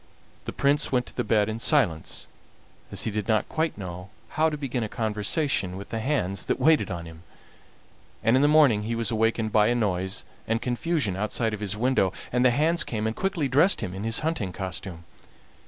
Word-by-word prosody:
The - - -4
Prince 140 +1 +1
went 125 -1 +1
to - - -4
bed 105 -1 +2
in 110 +1 -4
silence, 115 - +1 0.7
as - - 0
he 110 - -2
did 105 -1 -3
not 110 -2 +1
quite 160 0 -1
know 90 -1 -7 0.2
how 160 +1 +2
to 150 - -4
begin 130 -4 -2
a 110 - -4
conversation 105 - -1
with 100 - -9
the 115 - -3
hands 110 -7 -1
that - - 0
waited 160 -1 +3
on 85 -3 -5
him, 80 0 -12 1.0
and 115 - +4
in 130 - +4
the 145 - +5
morning 145 -8 +5
he 115 +2 -3
was 115 +1 0
awakened 115 0 +1
by 105 0 +4
a 120 - +2
noise 95 -4 -1 0.2
and 115 +1 +1
confusion 125 - -1
outside 110 +3 -1
of 110 - -4
his 105 -1 -3
window, 120 -5 +2 0.2
and 125 0 +2
the 130 - +6
hands 155 +6 +2
came 110 -2 -3
and 110 0 -1
quickly 185 -7 -1
dressed 150 +9 +4
him 95 -5 -4
in 105 +4 -3
hunting 135 - -1
costume. 90 -2 -6
115 Hz, 200 wpm, -26 LUFS, 100-140 Hz, 1.0 s, the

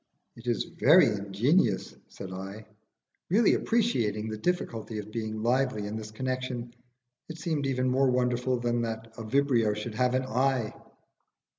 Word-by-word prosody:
"It 115 +1 -13
is 120 - +1
very - - +5
ingenious," 105 - +1
said 95 -1 -9
I, 95 +3 -7 0.6
really 215 +5 +4
appreciating 115 - +1
the 110 - -3
difficulty 115 -7 -2
of 105 0 -6
being 110 -1 -4
lively 125 -3 +1
in 105 +1 -4
this 110 -1 -6
connection: 125 0 -4 0.6
it 160 - -7
seemed 155 -4 -1
even 130 -1 0
more 130 +1 +3
wonderful 125 0 +1
than 120 0 0
that 115 0 -5
a - - -4
Vibrio 115 -3 +2
should 105 +2 -5
have 125 +2 +1
an 130 - +1
eye. 130 -2 0
120 Hz, 150 wpm, -28 LUFS, 110-130 Hz, 0.6 s, very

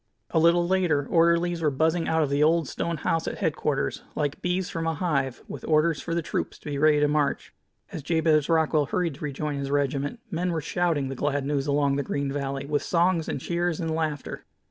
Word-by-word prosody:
A 160 - +3
little 170 +1 +4
later 175 -6 +2
orderlies 170 0 +2
were 155 - +3
buzzing 160 +4 +1
out 160 0 +2
of 140 - -2
the 140 +1 +1
old 160 0 +3
stone 170 +4 -3
house 165 +3 -1
at - - -3
headquarters 150 -5 -1
like 145 -1 -2
bees 180 +1 -1
from 165 -1 -3
a 165 - 0
hive, 140 -7 -1
with - - -8
orders 155 0 +2
for 165 - -3
the 170 - -1
troops - - -3
to - - -25
be 140 - -2
ready 155 0 +4
to 150 - +3
march. 145 -1 0 0.4
As 155 - -5
Jabez 155 -1 +2
Rockwell 160 -3 +2
hurried 170 -1 -1
to 135 - -11
rejoin 145 0 -3
his 140 0 -3
regiment, 145 - -1
men 180 +1 -1
were 165 - 0
shouting 160 -3 0
the 135 - -4
glad 145 +1 -1
news 140 -1 -1
along 140 -1 +2
the - - +1
green 140 0 -2
valley, 140 -1 -3
with 145 0 0
songs 170 -1 +1
and - - -2
cheers 175 +2 -1
and 165 -2 -2
laughter. 155 -3 -3
155 Hz, 215 wpm, -26 LUFS, 145-170 Hz, 0.4 s, little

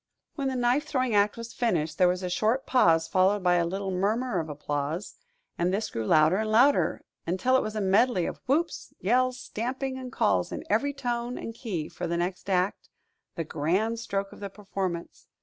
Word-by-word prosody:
When 275 -3 -2
the 265 - -1
knife 250 +5 +1
throwing 255 -5 0
act 205 +1 +3
was 230 0 -7
finished, 165 -10 -1
there 180 - +6
was 180 +1 0
a - - -1
short 225 +8 +1
pause 165 -10 +4
followed 190 +2 +2
by 180 -1 +4
a 170 -1 +1
little 195 +2 -3
murmur 205 +3 0
of 160 -1 -4
applause; 150 +4 -3 0.5
and 175 +1 +2
this 210 +3 -1
grew 110 -1 -3
louder 155 +3 +5
and 215 0 -1
louder, 255 +6 +4 0.2
until 190 +10 +2
it 260 - +4
was 215 - -4
a 215 - -1
medley 195 -1 +3
of - - -5
whoops, 320 +6 -1
yells, 255 +5 +2
stamping, 260 +3 -4
and 255 -1 -7
calls 90 - +1
in - - -5
every 280 +7 +1
tone 245 -2 -2
and 230 - -6
key 195 -10 -4
for 175 - -5
the 170 0 -1
next 180 +2 -3
act 185 +1 0 0.5
the 165 - -2
grand 185 +10 0
stroke 195 -3 -3
of - - -13
the 200 - -5
performance. 190 -4 -5
200 Hz, 200 wpm, -27 LUFS, 175-245 Hz, 0.5 s, there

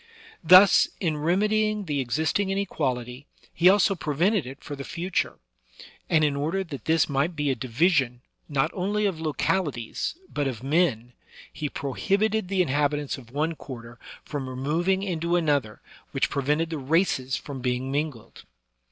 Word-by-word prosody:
Thus, 185 +2 +8
in 160 -5 0
remedying 210 +6 +1
the 145 -4 -1
existing 155 - 0
inequality, 135 -9 -2 0.3
he 175 +2 +5
also 200 0 +4
pre 150 -5 -4
vented 185 - +2
it 135 +2 -10
for 145 - -6
the 140 - -7
future; 175 +6 -2 0.7
and 155 -1 +4
in 145 -2 +2
order 160 +7 -1
that 145 -7 -9
this 160 -1 +3
might 145 +5 0
be 145 -2 0
a - - 0
division, 130 0 +1 0.3
not 135 -2 +1
only 205 +3 -1
of 180 -5 -1
localities, 155 - -1 0.2
but 145 -1 0
of 125 -2 -5
men, 135 -6 +1 0.4
he 150 -2 -3
prohib 195 - 0
ited 220 -3 -2
the 190 -1 +2
inhabitants 145 -1 0
of 120 -3 -15
one 150 +6 -1
quarter 120 -6 -10 0.3
from 140 -3 -4
removing 165 +9 0
into 170 -2 -1
another, 145 -10 0 0.3
which - - 0
prevented 150 +4 0
the 160 - -3
races 135 -3 +1
from 135 -3 -7
being 125 +1 -1
mingled. 145 -5 -4
150 Hz, 155 wpm, -26 LUFS, 135-180 Hz, 0.7 s, Thus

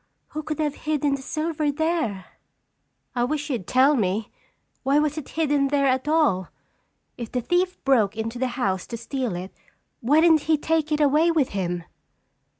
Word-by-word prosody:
Who 310 - -4
could 305 0 -4
have 300 -2 0
hidden 295 -2 -1
the 275 - -3
silver 310 +1 -1
there?" 305 - -1 0.9
"I 240 - +1
wish 295 +3 -2
you'd 230 -9 -3
tell 270 +4 +4
me. 210 -1 -1 0.5
Why 275 +2 +2
was 300 -1 +1
it 310 -4 -6
hidden 290 -3 +2
there 280 0 +1
at 260 +1 +1
all? 295 - +2 0.7
If 235 -2 -6
the 250 - -1
thief 355 +8 0
broke 225 -6 +2
into 225 +2 -4
the 260 - +1
house 190 -7 -1
to 230 - -5
steal 240 -3 -3
it 185 +2 -7 0.5
why 285 +7 +3
didn't 320 -3 +4
he 315 - +5
take 315 +1 0
it 300 0 +1
away 300 +4 +4
with 315 -6 +2
him?" 175 -3 -3
275 Hz, 175 wpm, -24 LUFS, 235-310 Hz, 0.9 s, he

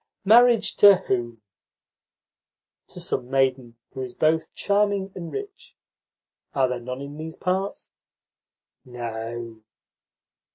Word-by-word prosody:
"Marriage 235 +2 +5
to 200 -1 +9
whom?" 120 - -3 1.4
"To - - -8
some 125 - -3
maiden 130 -3 0
who 130 - -7
is 125 -1 -7
both 160 +1 +1
charming 200 -1 +1
and 170 -3 -7
rich. 395 -2 -8 0.8
Are 135 -2 +3
there 125 -1 -3
none 125 +2 -6
in 140 +1 -8
these 160 +1 -7
parts?" 190 +2 -3 0.9
"No." 115 -1 -6
140 Hz, 110 wpm, -24 LUFS, 120-195 Hz, 1.4 s, to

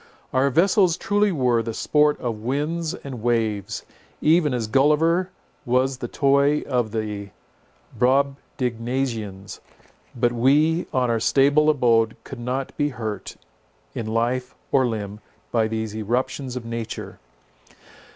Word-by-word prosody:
Our 130 +2 +3
vessels 180 - +3
truly 205 -1 +1
were 125 -7 +2
the 115 -1 -5
sport 150 0 +2
of 115 -3 -3
winds 155 +7 -2
and 130 -8 -8
waves, 110 -4 -1 0.3
even 155 -1 +3
as 120 -3 -1
Gulliver 150 - +3 0.3
was 130 +1 +1
the 120 - -4
toy 140 +3 +2
of 125 -4 -1
the 105 -2 -4 0.7
Brobdignagians; 125 -5 -1 0.6
but 120 0 +2
we 150 +8 +3
on 125 -2 +1
our 115 - +1
stable 145 +6 +4
abode 115 -6 +3
could 135 - -9
not 130 +3 -3
be 145 0 +1
hurt 110 -5 -6 0.6
in 110 - -4
life 120 +3 -1 0.2
or 130 -2 +4
limb 105 -3 -4 0.3
by 115 -2 +2
these 110 -1 -3
eruptions 125 +4 -2
of 125 -2 -5
nature. 115 -1 -6
125 Hz, 125 wpm, -23 LUFS, 115-145 Hz, 0.7 s, stable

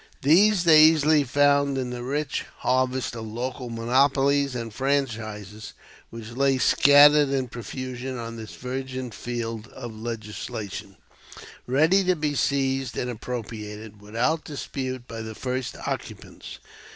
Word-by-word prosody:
These 185 +6 +5
they 160 -3 +7
easily 155 -1 +5
found 140 +1 +2
in 125 -2 -3
the 125 -1 -5
rich 140 +3 -2 0.2
harvest 130 -2 0
of 110 -1 -6
local 125 +3 -5
monopolies 135 +4 +2
and 115 -2 -5
franchises 110 -6 -3 0.4
which 115 -1 -9
lay 135 +2 +2
scattered 145 +2 +6
in 135 -2 -1
profusion 130 +2 -6
on 115 -1 -6
this 110 -1 -9
virgin 130 0 -5
field 115 -1 -5
of 120 -3 -9
legislation, 105 -3 -6 0.7
ready 160 +10 +4
to 185 0 +3
be 150 -2 -1
seized 135 -2 0
and 125 - -2
appropriated 110 -3 -7
without 120 +10 -1
dispute 130 -4 -5
by 115 -1 -6
the 110 0 -7
first 130 0 -3
occupants. - - -6
130 Hz, 125 wpm, -25 LUFS, 115-140 Hz, 0.7 s, they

